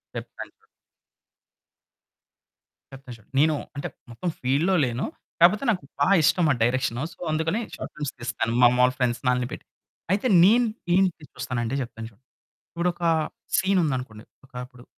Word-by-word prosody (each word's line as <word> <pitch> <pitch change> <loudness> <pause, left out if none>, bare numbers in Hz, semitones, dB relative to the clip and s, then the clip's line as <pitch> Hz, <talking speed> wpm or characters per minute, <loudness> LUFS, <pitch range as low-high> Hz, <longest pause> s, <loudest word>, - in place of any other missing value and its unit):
చెప్తాండి. - - -8 2.3
చెప్తా 135 -1 -12
చూడండి. 110 -2 -22
నేను 155 +1 +4 0.2
అంటే 140 - -4 0.2
మొత్తం 170 +10 -3
ఫీల్డ్‌లో 145 +9 +2
లేను. 120 +1 -2 0.4
కాపోతే 185 +8 +5
నాకు 180 - -3 0.2
బాగా 195 - +4
ఇష్టంమాటా 150 -7 +3
డైరెక్షను, 130 +1 0
సో, - - -24
అందుకని 160 +7 0 0.2
షార్ట్ - - -7
ఫిల్మ్స్ 145 -2 -4
తీస్తాను. 115 -1 -2
మా 120 - +9
మాములు 125 +1 +4
ఫ్రెండ్స్‌ని 125 0 0
ఆళ్ళని 125 -1 -1
పెట్టి - - -9 0.5
అయితే 200 +6 +1 0.2
నేన్ 230 +6 +6 0.3
నేనేంటి 180 -3 +2
చూస్తానంటే 125 -2 -3
చెప్తాను 115 -2 -7
చూడు 110 +4 -28 0.5
ఇప్పుడొక 175 0 -2 0.5
సీనుందనుకోండి 135 - 0 0.2
ఒకప్పుడు 125 -1 -10
135 Hz, 130 wpm, -25 LUFS, 125-175 Hz, 2.3 s, మా